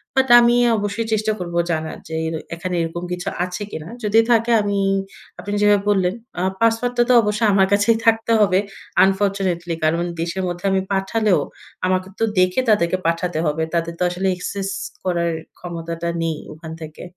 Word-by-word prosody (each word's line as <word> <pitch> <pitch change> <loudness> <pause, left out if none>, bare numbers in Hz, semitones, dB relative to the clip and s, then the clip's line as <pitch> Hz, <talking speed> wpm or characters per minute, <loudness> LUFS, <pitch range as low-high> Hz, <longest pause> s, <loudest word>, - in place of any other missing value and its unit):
But 265 0 +3
আমি 240 0 +4 0.2
অবশ্যই 205 +2 -2
চেষ্টা 215 0 +1
করবো 175 -1 -4
জানার 160 -1 -3
য্‌ - - -14
এই 160 - -2 0.3
এখানে 180 +2 -4
এরকম 165 +1 -4
কিছু 180 0 -4 0.2
আছে 180 +3 -5
কিনা? 160 +1 -6 0.2
যদি 210 +1 +4
থাকে 230 0 +3
আমি, 205 -1 -1 0.6
আপনি 205 - -5
যেভাবে 205 -1 +4
বললেন, 190 -3 +2 0.3
আ - - -1 0.2
পাসওয়ার্ডটা 240 +2 +2
তো - - +6
অবশ্যই 210 +1 +1
আমার 190 -1 +4
কাছেই 205 +3 +3
থাকতে 225 0 +3
হবে, 190 -2 +4 0.5
unfortunately। 190 -3 0
কারণ 165 +2 +2 0.2
দেশের 170 +3 -2
মধ্যে 175 +1 -5
আমি 190 0 +2
পাঠালেও 195 +1 +1 0.5
আমাকে 185 0 0
তো - - +1 0.2
দেখে 185 +7 +3
তাদেরকে 185 -4 +3
পাঠাতে 170 0 -1
হবে। 155 +1 0
তাদের 170 0 -1
তো - - +1
আসলে 180 +2 -2
access 195 +1 -4 0.3
করার 170 -2 0 0.3
ক্ষমতাটা 170 -1 -5
নেই 160 -2 -1 0.2
ওখান 160 +1 -9
থেকে। 155 0 -10
185 Hz, 170 wpm, -20 LUFS, 170-205 Hz, 0.6 s, তো